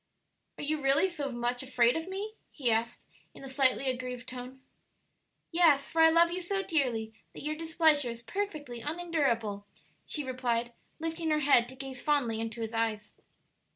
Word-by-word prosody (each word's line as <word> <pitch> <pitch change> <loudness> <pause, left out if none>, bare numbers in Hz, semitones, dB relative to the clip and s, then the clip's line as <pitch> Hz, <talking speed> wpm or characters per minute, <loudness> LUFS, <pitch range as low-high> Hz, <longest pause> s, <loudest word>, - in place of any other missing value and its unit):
"Are - - -6
you 305 +1 -1
really 275 +6 +4
so 295 -7 -4
much 240 0 -1
afraid 250 -2 +3
of 325 +1 -3
me?" 405 +3 -4 0.2
he 255 -6 0
asked, 225 +1 -1 0.3
in - - -12
a - - -6
slightly 265 0 +2
aggrieved 250 -1 -3
tone. 255 +1 -8 0.9
"Yes; 325 -5 +4
for 325 - +1
I 320 - +8
love 335 +1 +5
you 365 +1 -3
so 390 +2 -1
dearly 245 - 0 0.2
that - - -8
your 305 +1 -1
displeasure 315 -4 +3
is 235 0 -7
perfectly 300 - -4
unendurable," 275 -11 -1 0.4
she 300 - -3
replied, 240 -2 -1 0.3
lifting 325 0 -2
her 305 -1 +2
head 245 -4 +5
to 260 - -10
gaze 265 -1 -7
fondly 250 -7 +1
into 225 +1 -4
his 225 0 -4
eyes. 220 -2 -1
270 Hz, 170 wpm, -30 LUFS, 240-320 Hz, 0.9 s, I